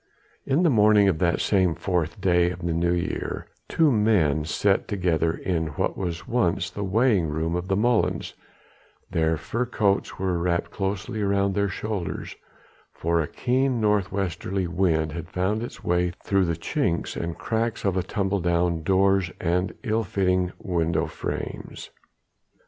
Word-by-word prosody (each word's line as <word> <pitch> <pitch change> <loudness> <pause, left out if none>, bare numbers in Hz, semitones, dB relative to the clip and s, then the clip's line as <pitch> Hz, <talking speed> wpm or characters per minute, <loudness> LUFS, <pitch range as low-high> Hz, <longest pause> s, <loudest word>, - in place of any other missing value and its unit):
In 140 +6 +2
the 165 - +4
morning 105 -3 +5
of 85 -5 +1
that 85 0 +2
same 95 -5 +2
fourth 85 -4 -1
day 90 -1 +3
in 90 -1 -6
the 85 - 0
New 85 +1 +1
Year, 85 - -3 0.2
two 160 -3 +3
men 95 - +2
sat 95 +5 +1
together 85 -5 +1
in 85 -2 -2
what - - 0
was 85 -3 -4
once 115 -6 0
the 100 - -4
weighing 100 -2 +2
room 80 +2 -2
of 90 +1 -3
the 95 - +1
molens; 120 +1 +1 0.8
their 80 -2 +1
fur 120 +9 -2
coats 100 -4 0
were 95 -2 -1
wrapped 85 0 -1
closely 100 +2 -3
round 100 -1 +1
their 100 0 +1
shoulders, 100 -2 -4 0.6
for 85 0 0
a 75 - -2
keen 130 - 0
north 105 -3 +1
westerly 95 0 -2
wind 85 -3 +1
had 85 +1 -6
found 95 +4 -1
its 120 - -7
way 90 0 +1
through 95 -2 +2
the 85 -2 -1
chinks 85 - -1
and 85 0 -4
cracks 115 -1 -2
of 95 -2 0
tumble 100 0 0
down 85 -1 +1
doors 95 +1 +3
and 90 +2 0
ill 110 +1 0
fitting 90 -2 +1
window 85 -3 0
frames. - - -6
95 Hz, 155 wpm, -25 LUFS, 85-105 Hz, 0.8 s, morning